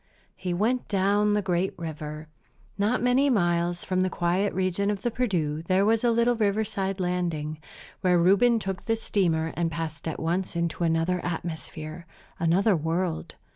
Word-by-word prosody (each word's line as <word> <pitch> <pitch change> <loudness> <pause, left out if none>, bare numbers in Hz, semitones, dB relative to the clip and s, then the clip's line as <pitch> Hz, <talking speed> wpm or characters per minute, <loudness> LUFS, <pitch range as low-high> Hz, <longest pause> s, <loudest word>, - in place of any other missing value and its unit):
He 185 -1 -4
went 225 +8 0
down 205 +1 +2
the 210 0 +1
great 185 0 0
river. 155 -1 -6 0.5
Not 210 +5 +1
many 255 +3 +4
miles 175 -5 +1
from 185 -1 0
the 185 - +1
quiet 185 +3 0
region 190 +2 0
of 205 -1 -2
the 240 - 0
Perdu 175 -11 -1
there 190 +2 +3
was 225 +2 +2
a 240 - +4
little 235 +1 +3
riverside 205 -2 0
landing, 170 -4 -2 0.4
where 180 -2 +3
Reuben 200 +7 +4
took 195 -3 -3
the 225 - +2
steamer 165 -7 0
and 170 -1 0
passed 160 0 -5
at 160 - -3
once 175 +3 -1
into 170 0 -1
another 165 +2 +1
atmosphere, 165 -1 -5 0.3
another 185 +5 +3
world. 165 +1 -2
185 Hz, 160 wpm, -26 LUFS, 165-205 Hz, 0.5 s, many